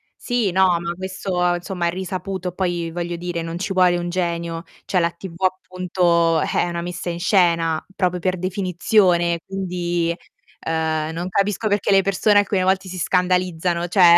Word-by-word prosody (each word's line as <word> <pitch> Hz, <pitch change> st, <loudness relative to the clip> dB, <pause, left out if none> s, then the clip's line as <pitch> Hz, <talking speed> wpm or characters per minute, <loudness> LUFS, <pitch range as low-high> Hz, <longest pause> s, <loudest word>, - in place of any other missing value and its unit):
Sì, 245 Hz, -6 st, 0 dB
no, 185 Hz, -1 st, +3 dB
ma 170 Hz, 0 st, -3 dB
questo 185 Hz, -1 st, -1 dB
insomma 175 Hz, 0 st, -3 dB
è -, -, +2 dB
risaputo, 185 Hz, 0 st, -4 dB
poi 175 Hz, -2 st, -2 dB
voglio 175 Hz, +1 st, -3 dB
dire 175 Hz, 0 st, -4 dB
non 165 Hz, +1 st, -4 dB
ci 195 Hz, +2 st, -3 dB
vuole 180 Hz, -1 st, +4 dB
un 175 Hz, 0 st, -3 dB
genio, 170 Hz, -2 st, -2 dB, 0.2 s
cioè 180 Hz, -, +1 dB
la 170 Hz, -, +2 dB
TV 185 Hz, 0 st, -10 dB
appunto 180 Hz, -3 st, +1 dB
è -, -, +1 dB
una 170 Hz, 0 st, -3 dB
messa 175 Hz, 0 st, -4 dB
in 170 Hz, -, -4 dB
scena, 170 Hz, -4 st, +2 dB
proprio 180 Hz, -2 st, 0 dB
per 185 Hz, +1 st, 0 dB
definizione, 180 Hz, -1 st, +2 dB
quindi, 175 Hz, -3 st, -2 dB, 0.4 s
ehm, 160 Hz, -1 st, -1 dB
non 170 Hz, +2 st, -3 dB
capisco 200 Hz, +3 st, 0 dB
perché 205 Hz, -1 st, 0 dB
le 195 Hz, 0 st, +5 dB
persone 200 Hz, +2 st, +3 dB
alcune 200 Hz, -1 st, +2 dB
volte 190 Hz, +1 st, +1 dB
si 185 Hz, 0 st, -6 dB
scandalizzano, 180 Hz, -1 st, +1 dB
cioè 175 Hz, -2 st, +7 dB
180 Hz, 165 wpm, -21 LUFS, 170-190 Hz, 0.4 s, cioè